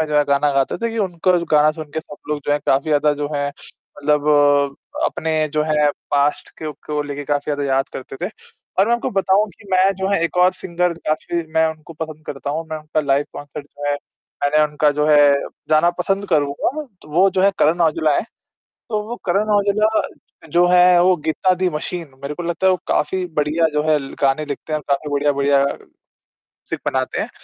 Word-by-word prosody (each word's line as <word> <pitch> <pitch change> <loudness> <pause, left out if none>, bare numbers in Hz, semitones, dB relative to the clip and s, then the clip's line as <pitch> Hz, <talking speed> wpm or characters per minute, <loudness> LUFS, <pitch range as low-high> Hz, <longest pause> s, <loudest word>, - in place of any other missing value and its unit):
में 160 - +1
जो 150 -1 -1
है 145 - +4
गाना 140 +1 +2
गाते 135 -1 +1
थे 230 0 -1
कि 225 - -5
उनका 185 -2 +1
जो 170 - -3
गाना 150 0 +5
सुन 155 -1 -8
के 160 - -1
सब 150 - -12
लोग 150 -1 -2
जो - - 0
हैं 145 - +1
काफ़ी 135 +1 +3
ज़्यादा 150 0 +3
जो 145 - -1
है 145 0 0
मतलब 145 -1 +1 0.3
अपने 160 0 -1 0.2
जो 150 - +2
है 150 -1 +3 0.2
पास्ट 145 +1 +1
को 155 - -3
को 150 -1 -1
लेके 145 0 -6
काफ़ी 145 0 0
ज़्यादा 145 0 -2
याद 135 0 +1
करते 130 0 -8
थे। - - -6 0.5
और 195 - +4
मैं 235 - +4
आपको 235 - -2
बताऊँ 195 +2 +2
कि 205 - -18
मैं 185 +1 +4
जो 190 +1 -2
है 200 -4 +1
एक 170 - -3
और 180 +1 +5
सिंगर 180 0 -1
काफ़ी 160 +2 -1
मैं 160 0 +4
उनको 155 +1 -11
पसंद 155 -1 -7
करता 140 0 -5
हूँ, 160 +3 -3
मैं 155 - -2
उनका 155 0 -2
लाइव 140 -1 +1
कॉन्सर्ट 145 0 -8
जो 145 0 -10
है 145 - +2 0.5
मैंने 155 +2 +3
उनका 150 0 +1
जो 150 +1 0
है 150 -1 +6 0.5
जाना 155 +3 +4
पसंद 195 +3 -1
करूँगा, 145 -4 +1 0.3
तो - - -15
वो 185 +3 +5
जो 185 0 0
है 200 - +5
करण 165 +4 +3
औजला 155 -2 +2
हैं। - - 0 0.7
तो 215 -2 -1
वो 240 - -3
करण 200 +4 +1
औजला 210 +2 +2 0.5
जो 175 +2 +4
हैं 180 0 +6
वो 180 +1 +4
गीता 185 +4 +2
दी 185 0 0
मशीन 165 +1 -5
मेरे 140 +2 -3
को 175 - -6
लगता 175 +2 0
है - - +6
वो 185 - 0
काफ़ी 185 -1 0
बढ़िया 150 +3 +2
जो 150 0 +1
है 155 - +4
ल 135 -1 -8
गाने 140 +2 +2
लिखते 145 +2 -6
हैं - - +2
और - - -15
काफ़ी 140 +2 0
बढ़िया-बढ़िया, 140 -1 +2 1.1
सिक - - -3
बनाते - - -1
हैं। - - -4
155 Hz, 215 wpm, -20 LUFS, 145-180 Hz, 1.1 s, है